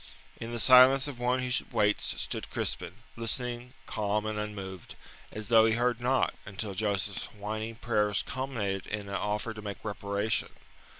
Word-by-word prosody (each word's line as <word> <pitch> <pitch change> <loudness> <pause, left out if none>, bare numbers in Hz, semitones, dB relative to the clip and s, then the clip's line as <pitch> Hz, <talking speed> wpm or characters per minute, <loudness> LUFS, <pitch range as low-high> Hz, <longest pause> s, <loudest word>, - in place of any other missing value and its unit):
In 115 +1 -6
the 120 - -2
silence 130 +3 +7
of 135 -4 -6
one 125 +1 +1
who 125 - -2 0.2
waits 105 -3 +1
stood - - -4
Crispin, - - -2 0.2
listening, 120 +1 -3
calm 105 0 -1
and 110 -1 -2
unmoved, 95 -4 -6 0.4
as 110 0 -6
though 115 -1 +7
he 110 - +3
heard 120 +1 +1
not, 130 +1 +2
until 100 +1 -4
Joseph's 100 +1 -1
whining 110 +2 -5
prayers 105 -3 +1
culminated 115 -8 -3
in 105 -1 -4
an - - -5
offer 105 +3 -1
to 110 - -8
make 100 0 -7
reparation. 100 +1 -1
110 Hz, 160 wpm, -30 LUFS, 105-120 Hz, 0.4 s, silence